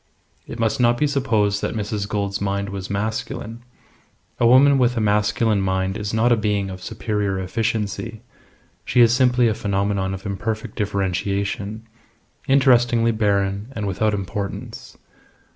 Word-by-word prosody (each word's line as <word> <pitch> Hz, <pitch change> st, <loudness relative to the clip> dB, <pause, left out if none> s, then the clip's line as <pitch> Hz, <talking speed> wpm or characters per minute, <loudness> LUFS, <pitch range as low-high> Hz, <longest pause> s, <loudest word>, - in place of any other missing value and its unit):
It -, -, -7 dB
must 115 Hz, 0 st, 0 dB
not 120 Hz, -1 st, +3 dB
be 150 Hz, -, +2 dB
supposed 110 Hz, -8 st, +1 dB
that -, -, -2 dB
Mrs. 105 Hz, -1 st, -3 dB
Gould's 100 Hz, -2 st, -2 dB
mind 100 Hz, 0 st, -1 dB
was 95 Hz, -1 st, -6 dB
masculine. 110 Hz, +2 st, -4 dB, 0.8 s
A 120 Hz, -, +4 dB
woman 135 Hz, +3 st, +6 dB
with 125 Hz, -1 st, +2 dB
a -, -, +2 dB
masculine 105 Hz, 0 st, +1 dB
mind 95 Hz, 0 st, -1 dB
is 105 Hz, -1 st, -4 dB
not 115 Hz, +2 st, +2 dB
a -, -, +6 dB
being 105 Hz, -3 st, -1 dB
of 95 Hz, 0 st, -8 dB
superior 105 Hz, -1 st, -2 dB
efficiency; 110 Hz, +2 st, -3 dB, 0.6 s
she 125 Hz, -, +2 dB
is 115 Hz, -1 st, +6 dB
simply 125 Hz, -1 st, +3 dB
a 110 Hz, -, +2 dB
phenomenon 100 Hz, -2 st, -1 dB
of 95 Hz, -, -11 dB
imperfect 110 Hz, +3 st, -4 dB
differentiation 100 Hz, +2 st, -2 dB, 0.6 s
interestingly 120 Hz, -4 st, +4 dB
barren 100 Hz, -1 st, 0 dB
and 105 Hz, -, -3 dB
without 105 Hz, +2 st, 0 dB
importance. 100 Hz, +1 st, -6 dB
105 Hz, 145 wpm, -22 LUFS, 100-115 Hz, 0.8 s, woman